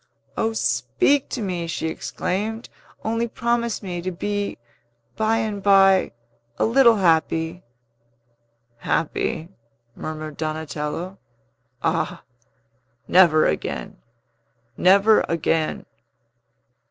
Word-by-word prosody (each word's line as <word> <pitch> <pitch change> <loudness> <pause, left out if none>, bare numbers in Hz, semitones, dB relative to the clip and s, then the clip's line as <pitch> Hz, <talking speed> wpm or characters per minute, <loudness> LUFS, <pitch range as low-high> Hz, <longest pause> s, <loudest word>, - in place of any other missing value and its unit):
"O, 225 - 0
speak 130 - +1
to 240 - -3
me!" 175 -3 -3
she 165 - -3
exclaimed. 215 +7 -3 0.4
"Only 230 +1 0
promise 235 -1 -1
me 175 -3 -4
to 185 +2 -3
be, 205 +3 -3 0.6
by 220 +1 +1
and 215 -3 -2
by, 195 -4 +5 0.4
a - - +2
little 235 0 +5
happy!" 165 -2 +1 1.2
"Happy?" 165 +3 -2 0.5
murmured 155 -1 -6
Donatello. 155 +3 -4 0.6
"Ah, - - -1 0.8
never 170 -4 +5
again! 75 - -3 0.8
never 200 +4 +5
again!" 165 -1 0
185 Hz, 90 wpm, -23 LUFS, 160-220 Hz, 1.2 s, by